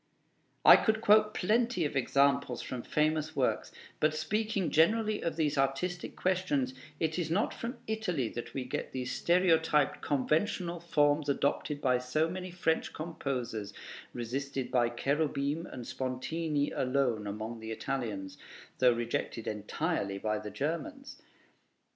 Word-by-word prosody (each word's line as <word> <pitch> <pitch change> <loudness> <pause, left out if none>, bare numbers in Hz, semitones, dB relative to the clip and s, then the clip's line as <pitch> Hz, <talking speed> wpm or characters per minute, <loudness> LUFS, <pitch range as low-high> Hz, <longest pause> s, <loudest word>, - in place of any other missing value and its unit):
I - - +11
could 220 -1 +1
quote 215 0 +5
plenty 225 -2 +2
of 145 - -3
examples 140 -1 +2
from 125 -2 -5
famous 155 +3 0
works; 130 -3 0 0.3
but 155 0 +2
speaking 200 +4 -1
generally 215 +6 +3
of 165 - -2
these 150 -3 +1
artistic 155 +7 -1
questions, 175 -9 0 0.3
is 160 +1 0
it 165 -2 -1
not 200 +6 +1
from 235 +3 -5
Italy 195 - -1
that 120 - -7
we 130 -2 -2
get 125 - -4
those 125 -1 -3
stereotyped 160 -5 +3
conventional 170 - 0
forms 145 -3 +2
adopted 145 +1 0
by 125 -2 +3
so 130 +6 +1
many 185 +2 -5
French 170 -2 0
composers, 125 -10 -4 0.4
resisted 130 +2 -3
by 120 -2 +3
Cherubim 145 +5 -1
and 125 -2 -8
Spontini 145 +4 -2
alone 125 -5 0
among 110 +3 -5
the 110 0 -7
Italians, 110 -5 -4 0.4
though 125 -1 +6
rejected 115 -1 -3
entirely 105 - -2
by 105 +1 -1
the 105 0 -6
Germans? 270 - -4
145 Hz, 135 wpm, -31 LUFS, 125-170 Hz, 0.4 s, I